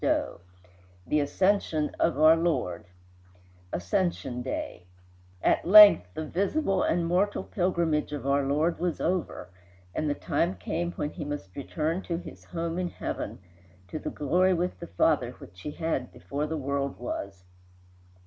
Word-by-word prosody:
XXX - - 0 0.7
THE 150 - +1
ASCENSION 160 0 +1
OF - - +2
OUR 155 +1 +7
LORD 160 - -1 0.9
Ascension 125 - -1
Day 90 -6 -5 0.6
At - - +3
length 205 - +9
the 155 - -3
visible 195 - 0
and 170 0 +1
mortal 185 +4 +1
pilgrimage 170 -5 0
of 145 -3 -5
our 140 +1 +3
Lord 150 +5 0
was 175 -1 -1
over, 175 - -2 0.4
and 155 - -1
the 145 - 0
time 170 +3 0
come 175 +1 -3
when 150 - -3
he - - -6
must 145 -10 -6
return 160 +5 -2
to 170 -3 -3
his 175 - -10
home 170 0 -3
in 180 -1 -1
heaven, - - -5 0.5
to 155 - -4
the - - -4
glory 180 +6 +2
with 180 +1 -2
the 170 - -7
Father 90 - +1
which 90 +1 -14
he - - -5
had 150 -5 -2
before 140 - -4
the 160 +1 -3
world 140 -1 -2
was. 100 -6 -6
160 Hz, 150 wpm, -28 LUFS, 140-175 Hz, 0.9 s, length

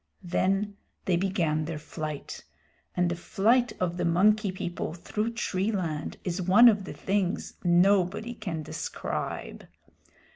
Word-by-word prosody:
Then 195 +3 0 0.3
they 185 - +2
began 170 -4 0
their 165 0 -4
flight; 155 -1 -6 0.5
and 180 0 +3
the 175 - -1
flight 230 +7 +2
of 175 -1 -1
the 175 - -1
Monkey 200 +4 +3
People 175 -3 -4
through 210 +6 -3
tree 200 -3 -1
land 165 -7 -3
is 180 0 -2
one 195 +7 +7
of 205 -4 +4
the - - -6
things 195 -2 -1
nobody 190 +5 +3
can 180 -9 -5
describe. 155 +1 -5
185 Hz, 135 wpm, -28 LUFS, 170-205 Hz, 0.5 s, one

